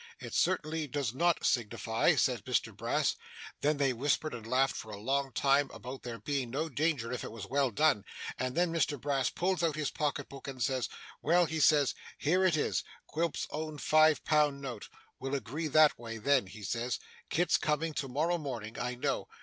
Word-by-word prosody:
"It -, -, -8 dB
certainly 155 Hz, 0 st, +1 dB
does 135 Hz, -4 st, -2 dB
not 170 Hz, +4 st, +2 dB
signify," 115 Hz, -1 st, +2 dB
says -, -, +2 dB
Mr -, -, -1 dB
Brass. -, -, 0 dB, 0.5 s
Then 150 Hz, +1 st, +2 dB
they 135 Hz, -2 st, +2 dB
whispered 145 Hz, +4 st, 0 dB
and 115 Hz, -2 st, -7 dB
laughed 130 Hz, +3 st, +2 dB
for 110 Hz, -, -7 dB
a 105 Hz, -, -6 dB
long 135 Hz, +4 st, 0 dB
time 140 Hz, +1 st, +3 dB
about 125 Hz, +4 st, -8 dB
there 120 Hz, -2 st, -6 dB
being 135 Hz, -1 st, -2 dB
no 150 Hz, +6 st, -2 dB
danger 145 Hz, -4 st, 0 dB
if 125 Hz, -3 st, -3 dB
it -, -, -6 dB
was 110 Hz, -3 st, -7 dB
well 135 Hz, +4 st, +1 dB
done, 135 Hz, -3 st, +3 dB, 0.4 s
and 125 Hz, 0 st, -2 dB
then 175 Hz, -1 st, +2 dB
Mr 155 Hz, -4 st, +1 dB
Brass 135 Hz, -2 st, +1 dB
pulls 185 Hz, -1 st, 0 dB
out 165 Hz, -3 st, +1 dB
his 155 Hz, -2 st, -1 dB
pocket 145 Hz, -2 st, -2 dB
book, 135 Hz, 0 st, -10 dB
and 130 Hz, -3 st, -3 dB
says, 130 Hz, -1 st, 0 dB, 0.3 s
"Well," 175 Hz, +3 st, +4 dB
he 160 Hz, 0 st, -3 dB
says, 145 Hz, -2 st, +5 dB, 0.2 s
"here 180 Hz, +6 st, +2 dB
it 175 Hz, -4 st, +3 dB
is -, -, 0 dB, 0.2 s
Quilp's 165 Hz, -1 st, -1 dB
own 155 Hz, 0 st, -4 dB
five 155 Hz, -1 st, +4 dB
pound 150 Hz, -2 st, +3 dB
note. 125 Hz, -6 st, -6 dB, 0.3 s
We'll 135 Hz, +1 st, -2 dB
agree 140 Hz, +6 st, -3 dB
that 155 Hz, -2 st, +5 dB
way, 115 Hz, -1 st, -6 dB
then," 130 Hz, -1 st, +2 dB
he 105 Hz, +2 st, -11 dB
says. 115 Hz, +5 st, -1 dB, 0.3 s
"Kit's 175 Hz, +1 st, +3 dB
coming 155 Hz, +1 st, 0 dB
to 140 Hz, -, -2 dB
morrow 160 Hz, +7 st, 0 dB
morning, 120 Hz, -7 st, -5 dB
I 125 Hz, 0 st, -2 dB
know. 135 Hz, +2 st, -1 dB
140 Hz, 195 wpm, -32 LUFS, 125-155 Hz, 0.5 s, says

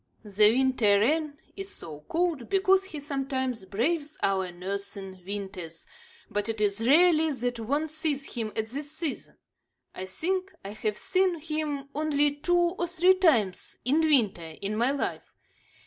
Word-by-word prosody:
The 210 Hz, 0 st, +5 dB
winter 240 Hz, -5 st, +3 dB
wren 295 Hz, +5 st, +1 dB, 0.2 s
is 390 Hz, 0 st, -6 dB
so 155 Hz, -3 st, -9 dB
called 320 Hz, -, -1 dB
because 385 Hz, 0 st, +3 dB
he 320 Hz, -6 st, -7 dB
sometimes 265 Hz, -5 st, -2 dB
braves 285 Hz, -, -1 dB
our 190 Hz, -2 st, +1 dB
northern 195 Hz, +1 st, -5 dB
winters, 185 Hz, -4 st, -6 dB, 0.4 s
but 205 Hz, +1 st, -2 dB
it 225 Hz, -1 st, -3 dB
is 210 Hz, +2 st, +1 dB
rarely 320 Hz, +1 st, +5 dB
that 245 Hz, -3 st, -2 dB
one 285 Hz, +8 st, 0 dB
sees 310 Hz, -2 st, -2 dB
him 225 Hz, -3 st, -3 dB
at 220 Hz, -, -1 dB
this 285 Hz, +4 st, -4 dB
season. 315 Hz, -2 st, -4 dB, 0.6 s
I 185 Hz, -, -6 dB
think 370 Hz, -, -2 dB
I 200 Hz, -, -5 dB
have 215 Hz, 0 st, -2 dB
seen 370 Hz, -2 st, +1 dB
him 305 Hz, -3 st, -3 dB
only 295 Hz, -1 st, +1 dB
two 350 Hz, +4 st, +2 dB
or 350 Hz, 0 st, +1 dB
three 360 Hz, +2 st, +5 dB
times 255 Hz, -, +2 dB
in 280 Hz, +5 st, +3 dB
winter 210 Hz, -, +2 dB
in 205 Hz, +2 st, -3 dB
my 235 Hz, +4 st, +2 dB
life. 280 Hz, 0 st, -3 dB
270 Hz, 150 wpm, -28 LUFS, 205-315 Hz, 0.6 s, The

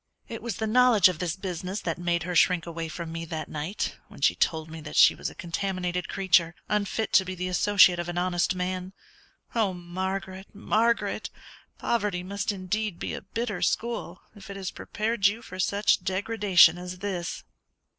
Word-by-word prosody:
"It 230 Hz, -, -7 dB
was 230 Hz, -3 st, -4 dB
the 220 Hz, -, -2 dB
knowledge 220 Hz, -3 st, +5 dB
of 175 Hz, -3 st, -5 dB
this 175 Hz, -2 st, -1 dB
business 185 Hz, +1 st, -4 dB
that 165 Hz, 0 st, -3 dB
made 170 Hz, -2 st, 0 dB
her 180 Hz, +1 st, -4 dB
shrink 175 Hz, -1 st, +4 dB
away 165 Hz, -1 st, -5 dB
from 165 Hz, +1 st, -6 dB
me 165 Hz, 0 st, -4 dB
that 160 Hz, -1 st, -5 dB
night 155 Hz, +7 st, -4 dB
when -, -, -14 dB
she -, -, +4 dB
told 160 Hz, -1 st, 0 dB
me 160 Hz, 0 st, -9 dB
that 150 Hz, 0 st, -8 dB
she -, -, +7 dB
was -, -, -4 dB
a -, -, -14 dB
contaminated 180 Hz, 0 st, -3 dB
creature, 175 Hz, -3 st, +2 dB
unfit 210 Hz, +1 st, -1 dB
to 190 Hz, -, +6 dB
be 185 Hz, 0 st, -5 dB
the 180 Hz, 0 st, -3 dB
associate 185 Hz, -1 st, +5 dB
of 175 Hz, 0 st, -3 dB
an 175 Hz, -, -4 dB
honest 180 Hz, 0 st, +1 dB
man 185 Hz, +1 st, -3 dB, 0.6 s
Oh, 210 Hz, -5 st, +1 dB
Margaret, 190 Hz, +2 st, -5 dB
Margaret! 230 Hz, +3 st, 0 dB, 0.5 s
poverty 205 Hz, -6 st, -1 dB
must 200 Hz, +2 st, -2 dB
indeed 200 Hz, 0 st, -3 dB
be -, -, -4 dB
a -, -, -5 dB
bitter 210 Hz, -1 st, -4 dB
school 220 Hz, -1 st, -2 dB
if 200 Hz, -1 st, -13 dB
it 200 Hz, -, -6 dB
has 190 Hz, -2 st, -4 dB
prepared 215 Hz, -1 st, 0 dB
you 220 Hz, +3 st, -3 dB
for 185 Hz, -, -9 dB
such 200 Hz, 0 st, +2 dB
degradation 190 Hz, -3 st, +4 dB
as 180 Hz, 0 st, -7 dB
this!" 180 Hz, -3 st, -4 dB
185 Hz, 185 wpm, -27 LUFS, 175-205 Hz, 0.6 s, she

